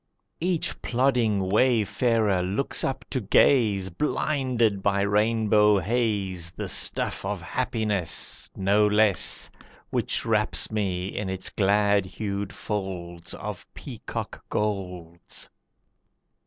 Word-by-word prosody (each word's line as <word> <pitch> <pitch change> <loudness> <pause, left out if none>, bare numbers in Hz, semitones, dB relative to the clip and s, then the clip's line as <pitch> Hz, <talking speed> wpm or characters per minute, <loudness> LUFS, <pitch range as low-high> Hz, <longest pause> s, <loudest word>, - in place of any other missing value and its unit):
Each 175 -1 -1
plodding 120 -6 +1
wayfarer 110 -2 +2
looks 95 +9 -1
up 135 - -3
to 130 - -1
gaze, 100 -3 +3
Blinded 125 - 0
by 100 0 +1
rainbow 105 0 +3
haze, 100 -4 -1
The - - -5
stuff - - +1
of 100 0 -3
happiness, 105 -5 -1
No 100 +2 +3
less, 105 -3 +3 0.4
Which - - -1
wraps 110 -1 +2
me 95 -3 -2
in 100 -2 -3
its 95 0 -3
glad 100 -1 +2
hued 100 0 -4
folds 90 -4 -5
Of - - -8
peacock - - -7
golds. 90 -5 -4
105 Hz, 100 wpm, -25 LUFS, 95-115 Hz, 0.4 s, gaze